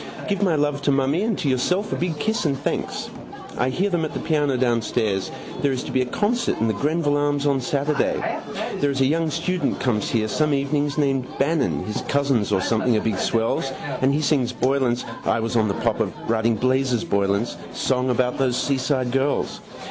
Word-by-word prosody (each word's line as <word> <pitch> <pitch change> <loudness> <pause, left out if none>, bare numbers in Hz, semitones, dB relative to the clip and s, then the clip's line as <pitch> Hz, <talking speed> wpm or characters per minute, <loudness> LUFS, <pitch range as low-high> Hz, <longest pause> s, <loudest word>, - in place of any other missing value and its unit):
Give 200 -1 -1
my 180 -5 +3
love 145 -1 0
to 145 - +2
mummy 135 +5 +2
and 220 -1 0
to 170 - -2
yourself 180 +11 +1
a - - 0
big 170 -3 -2
kiss 220 +8 0
and 140 -3 +1
thanks. - - -3 0.4
I 125 - +1
hear 190 +9 0
them 175 -2 +1
at 155 - -4
the - - -1
piano 145 -4 +1
downstairs. 115 -5 0 0.3
There 140 - +2
is 130 -1 -2
to - - -6
be 130 - +2
a 125 - -1
concert 220 - 0
in 115 - +2
the 110 - +1
Greville 145 - +1
Arms 145 0 0
on 140 -2 +2
Saturday. 140 +3 0 0.6
There 145 - +2
is 135 -1 -1
a - - +5
young 160 +3 +1
student 170 +3 -1
comes 115 -5 0
here 110 -2 +1
some 150 +6 +1
evenings 145 +1 0
named 135 -3 +1
Bannon 145 0 +1
his 105 - -3
cousins 140 -7 +1
or 95 -2 +2
something 115 +2 +2
are - - +1
big 105 -5 -1
swells 115 +4 0 0.3
and 130 +1 +4
he 145 +2 +1
sings 135 -5 +2
Boylan's 125 -1 +1 0.2
(I - - +1
was 115 +1 -2
on 110 -2 +3
the 100 - -1
pop - - 0
of - - 0 0.2
writing 115 0 +2
Blazes 130 0 +1
Boylan's) 100 +3 0 0.2
song 130 -1 0
about 125 +1 +1
those 130 -2 +1
seaside 130 -2 0
girls. 135 +2 0
135 Hz, 205 wpm, -23 LUFS, 120-150 Hz, 0.6 s, a